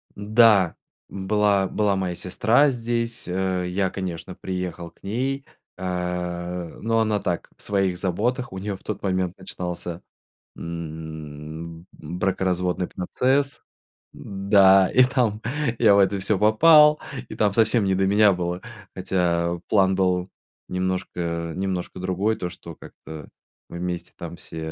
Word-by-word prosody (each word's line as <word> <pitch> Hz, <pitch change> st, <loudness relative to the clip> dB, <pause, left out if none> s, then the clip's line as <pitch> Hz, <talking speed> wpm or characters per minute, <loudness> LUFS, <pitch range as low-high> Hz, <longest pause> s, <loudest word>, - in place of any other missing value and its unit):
Да, 105 Hz, -3 st, +4 dB, 0.3 s
была 100 Hz, 0 st, +1 dB
была 105 Hz, -1 st, +1 dB
моя 90 Hz, -2 st, -2 dB
сестра 115 Hz, +11 st, +3 dB
здесь. 115 Hz, -1 st, -3 dB
Э, 95 Hz, 0 st, -1 dB
я, 95 Hz, +1 st, 0 dB
конечно, 90 Hz, -2 st, -5 dB
приехал 90 Hz, -2 st, -5 dB
к -, -, -34 dB
ней, 135 Hz, +7 st, -2 dB, 0.3 s
а, 90 Hz, -1 st, -3 dB
но 115 Hz, 0 st, +1 dB
она 110 Hz, -2 st, +1 dB
так, 90 Hz, -3 st, -3 dB
в -, -, -19 dB
своих 95 Hz, -3 st, 0 dB
заботах. 105 Hz, +7 st, -1 dB
У 95 Hz, -, -7 dB
неё 100 Hz, +1 st, -3 dB
в -, -, -26 dB
тот 105 Hz, -2 st, -5 dB
момент 95 Hz, -2 st, -1 dB
начинался, 90 Hz, -1 st, -6 dB, 0.5 s
м, 80 Hz, 0 st, -7 dB
бракоразводный 90 Hz, +2 st, -1 dB
процесс. 135 Hz, +9 st, 0 dB, 0.5 s
Да, 95 Hz, -1 st, +4 dB
и 130 Hz, -, +6 dB
там 120 Hz, -5 st, 0 dB, 0.4 s
я 105 Hz, -4 st, +6 dB
в -, -, +5 dB
это 100 Hz, 0 st, +3 dB
всё 95 Hz, +1 st, +1 dB
попал, 150 Hz, -, +6 dB, 0.3 s
и -, -, -7 dB
там 105 Hz, -2 st, +2 dB
совсем 110 Hz, 0 st, +3 dB
не 95 Hz, -1 st, +2 dB
до 95 Hz, -, +2 dB
меня 100 Hz, +1 st, +5 dB
было. 90 Hz, 0 st, -3 dB, 0.3 s
Хотя 85 Hz, -2 st, 0 dB
план 95 Hz, -2 st, +4 dB
был 90 Hz, -1 st, +1 dB, 0.4 s
немножко 90 Hz, -2 st, -2 dB
немножко 95 Hz, -1 st, -3 dB
другой, 95 Hz, +4 st, 0 dB
то 90 Hz, -, -4 dB
что 85 Hz, -2 st, -11 dB
как-то 80 Hz, -1 st, -11 dB, 0.4 s
мы 85 Hz, -, -7 dB
вместе 90 Hz, -1 st, -4 dB
там -, -, -7 dB
все, -, -, -11 dB
95 Hz, 135 wpm, -24 LUFS, 90-105 Hz, 0.5 s, и